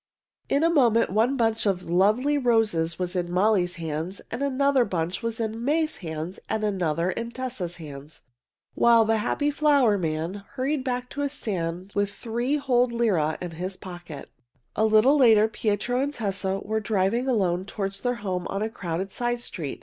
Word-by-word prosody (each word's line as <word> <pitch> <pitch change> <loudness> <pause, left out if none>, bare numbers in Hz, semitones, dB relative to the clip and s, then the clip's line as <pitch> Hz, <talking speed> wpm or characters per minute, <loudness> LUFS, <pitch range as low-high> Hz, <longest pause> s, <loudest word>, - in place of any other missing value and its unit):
In 280 +3 +2
a 330 - +4
moment 230 - +3
one 230 +7 +2
bunch 225 -2 +1
of 185 -2 0
the 170 - -4
lovely 215 +11 +3
roses 220 - +2
was 180 0 -2
in 175 -1 -2
Molly's 185 -1 +2
hands 165 +2 -4
and 230 - -4
another 280 -1 +2
bunch 180 -3 -2
was 230 -1 -3
in 225 0 -3
May's 310 +3 0
hands 160 +1 -5
and 220 0 -1
another 180 -4 0
in 230 +4 -4
Tessa's 235 -8 -4
hands, 150 -2 -10 0.5
while 235 -1 +5
the 225 0 +2
happy 290 +7 0
flower 280 -8 +3
man 165 +4 -3
hurried 275 +1 -1
back 250 -1 -3
to 285 - -4
his 285 0 0
stand 180 -5 -3
with 205 0 0
three 240 +6 -2
whole 250 -4 +2
lire 210 -10 +1
in 175 -1 -5
his 185 +3 -5
pocket. 175 -5 -9 0.4
A 220 - +2
little 220 +7 +5
later 220 -5 +6
Pietro 220 +3 -1
and 280 +2 0
Tessa 195 -6 -2
were 220 +1 0
driving 215 +4 0
alone 185 -7 +1
toward 195 0 -3
their 245 +6 -2
home 180 -2 -2
on 200 +2 -2
a 220 - -3
crowded 190 -3 -4
side 240 0 -1
street. 165 - -5
215 Hz, 180 wpm, -25 LUFS, 180-245 Hz, 0.5 s, later